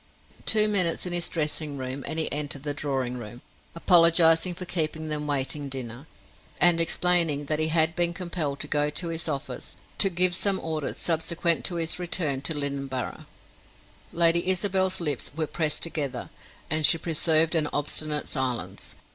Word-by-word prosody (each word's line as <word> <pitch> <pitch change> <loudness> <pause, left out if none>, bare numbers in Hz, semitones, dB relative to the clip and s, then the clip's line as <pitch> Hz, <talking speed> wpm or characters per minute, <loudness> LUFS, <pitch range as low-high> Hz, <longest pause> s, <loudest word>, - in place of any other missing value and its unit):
Two 215 -1 +3
minutes 185 -6 +1
in 180 - -4
his 175 -1 0
dressing 150 -2 -1
room, 130 +1 -5
and 160 - -4
he 160 - 0
entered 145 -2 -3
the 145 -1 -3
drawing 135 -4 -3
room, 120 +2 -10 0.3
apologizing 170 0 +4
for 180 - -7
keeping 160 -3 -2
them 150 -1 -3
waiting 145 0 0
dinner, 130 +1 -6 0.5
and 175 -1 +4
explaining 165 -4 +2
that 155 +1 -2
he 155 - +2
had 160 0 +2
been 175 -1 +1
compelled 170 -6 -4
to 145 - -3
go 150 0 +1
to 165 +3 -3
his 165 0 -3
office 140 -3 -6 0.2
to 195 - +6
give 180 0 +3
some 190 +1 +1
orders 155 -3 -4
subsequent 170 0 +1
to 175 - 0
his 165 +1 -2
return 165 -6 0
to 160 +3 0
Lynneborough. 140 -2 -5 0.8
Lady 170 +1 +3
Isabel's 190 0 +1
lips 150 -6 0
were 160 0 -1
pressed 155 0 -2
together, 140 -7 -3 0.4
and 155 +1 0
she 165 - +7
preserved 160 0 +2
an 155 -3 +1
obstinate 150 +1 0
silence. 130 -3 -3
160 Hz, 165 wpm, -25 LUFS, 145-170 Hz, 0.8 s, she